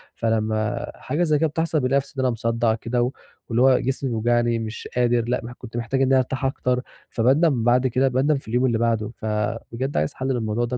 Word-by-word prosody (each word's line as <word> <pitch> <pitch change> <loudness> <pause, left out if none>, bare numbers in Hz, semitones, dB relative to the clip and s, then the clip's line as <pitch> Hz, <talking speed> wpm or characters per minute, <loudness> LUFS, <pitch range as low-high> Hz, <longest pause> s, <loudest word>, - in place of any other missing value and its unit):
فلمّا 110 0 -1
حاجة 150 +7 -2
زي 155 -3 +2
كده 160 - +3
بتحصل 160 +1 0
بنلاقي 130 0 +2
نفسي 140 0 -3
إن 130 - +1
أنا 125 - +3
مصدّع 115 0 0
كده، 120 +2 -1 0.4
واللي 120 +2 +1
هو 130 -1 +5
جسمي 135 +1 -1
بيوجعني 120 0 +1
مش 110 0 -6
قادر 120 -1 +2
لأ 125 - 0
مح 120 +1 -7
كنت 120 -1 -9
محتاج 120 +3 -1
إن 135 - +3
أنا 135 0 +4
ارتاح 130 +1 -1
أكتر، 125 -1 0 0.3
فباندَم 130 +2 +2
بعد 125 +2 +3
كده 130 +2 +2
باندَم 135 +3 +2
في 135 - -10
اليوم 125 +3 +1
اللي 120 -3 +2
بعدُه، 115 -2 0
فبجد 110 +5 -3
عايز 75 - 0
حَلّ 130 - -4
للموضوع 120 -2 0
ده 125 +1 -3
120 Hz, 210 wpm, -23 LUFS, 115-130 Hz, 0.4 s, هو